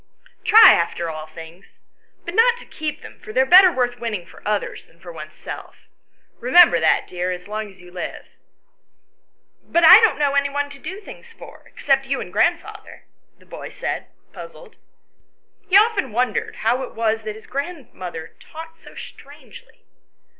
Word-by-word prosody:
Try 440 +1 +8
after 170 0 -2
all 155 0 -8
things; 165 +3 -14 0.5
but 340 - -6
not 470 +3 +3
to - - -14
keep 310 -1 -6
them, - - -13
for 215 - -11
they 255 - -1
are - - +2
better 365 +5 +7
worth 245 -4 -2
winning 215 -7 -5
for - - -17
others 210 -1 -3
than 165 - -27
for 175 0 -11
oneself. 155 -1 -10 0.6
Eemember 345 +9 +5
that, - - +2
dear, 180 0 -4
as 180 +1 -7
long 215 0 -5
as 190 -2 -18
you 180 - -15
live." 180 -1 -7 1.4
"But 340 0 +2
I 370 +5 +10
don't 445 -11 +2
know 290 -1 0
any 280 0 +1
one 285 0 -3
to 275 - -13
do 385 +7 -8
things 460 +3 -14
for, - - -14
except 270 -1 -1
you 275 0 -2
and - - -8
grandfather," - - -2 0.3
the - - -24
boy - - -9
said, - - -5 0.3
puzzled. - - -13 0.9
He 385 - +6
often 410 - +2
wondered 240 0 -2
how 240 +4 0
it 260 - -8
was 225 -1 -1
that 215 -1 -6
his 220 - -14
grandmother 250 - -7
talked 325 +1 -12
so - - -16
strangely. - - -14
255 Hz, 170 wpm, -20 LUFS, -, 1.4 s, I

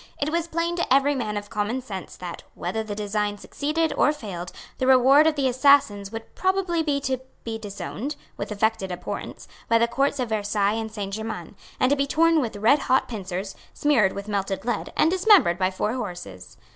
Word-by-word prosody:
It 290 +2 0
was 335 0 0
plain 335 +1 -1
to 340 - -2
every 275 +2 +4
man 215 -6 -2
of 205 0 -7
common 210 +5 -1
sense 200 -8 -7
that, 180 -2 -7
whether 185 +6 -3
the 215 -2 -5
design 205 0 -1
succeeded 305 +7 -1
or 295 - +4
failed, 190 - -6 0.3
the 260 - 0
reward 265 +4 +6
of 315 - +2
the 275 -2 +1
assassins 250 -6 +3
would 225 0 -8
probably 375 -3 +1
be 295 -3 0
to 265 -2 -1 0.2
be 225 -1 -4
disowned, 220 +6 -5 0.2
with - - -5
affected 210 -2 0
abhorrence, 180 0 -6 0.2
by 230 - +5
the 235 +1 +3
Courts 275 +4 0
of 245 -3 -1
Versailles 205 -1 +1
and 220 0 -3
Saint 200 -2 -5
Germains, 215 -3 -5 0.2
and 255 +1 +3
to - - +5
be 280 0 0
torn 330 +2 +3
with 230 -5 -3
redhot 255 +5 +3
pincers, 195 -3 -5 0.2
smeared 240 -10 +3
with 200 +1 -6
melted 195 -1 -2
lead, 240 - -2
and 320 - +4
dismembered 370 - +5
by 185 -1 +2
four 200 +4 -2
horses. 175 - -7
225 Hz, 195 wpm, -24 LUFS, 205-285 Hz, 0.3 s, reward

